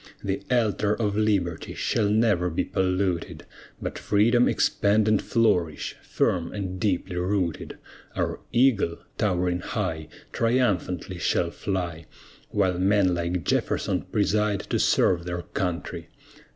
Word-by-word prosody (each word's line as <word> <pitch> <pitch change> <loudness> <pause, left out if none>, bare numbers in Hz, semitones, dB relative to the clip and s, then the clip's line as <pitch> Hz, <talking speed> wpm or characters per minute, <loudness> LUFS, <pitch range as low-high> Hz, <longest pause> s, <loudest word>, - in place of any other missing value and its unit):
The 95 0 -2
altar 110 -4 +2
of 105 -3 -1
Liberty 100 -6 0
shall 105 -2 0
never 105 -5 +2
be 80 - -1
polluted, 95 -2 -1 0.3
But - - -5
freedom 115 +4 +3
expand 105 +1 +2
and 110 -2 +3
flourish, 90 -9 +1
firm 85 -2 0
and 95 -3 -4
deeply 90 -3 -1
rooted. 90 -2 -1 0.4
Our - - -1
eagle, 115 -9 +3 0.2
towering 90 -3 +1
high, 80 -3 -3 0.3
Triumphantly 100 -7 0
shall 85 0 +1
fly, 85 -5 -4 0.4
While 95 -3 +1
men 95 -1 +3
like 85 0 -2
JEFFERSON - - 0
preside 105 -1 +1
to - - +1
serve 85 -2 +3
their 85 -1 -4
country! 85 -2 -4
95 Hz, 120 wpm, -25 LUFS, 90-105 Hz, 0.4 s, freedom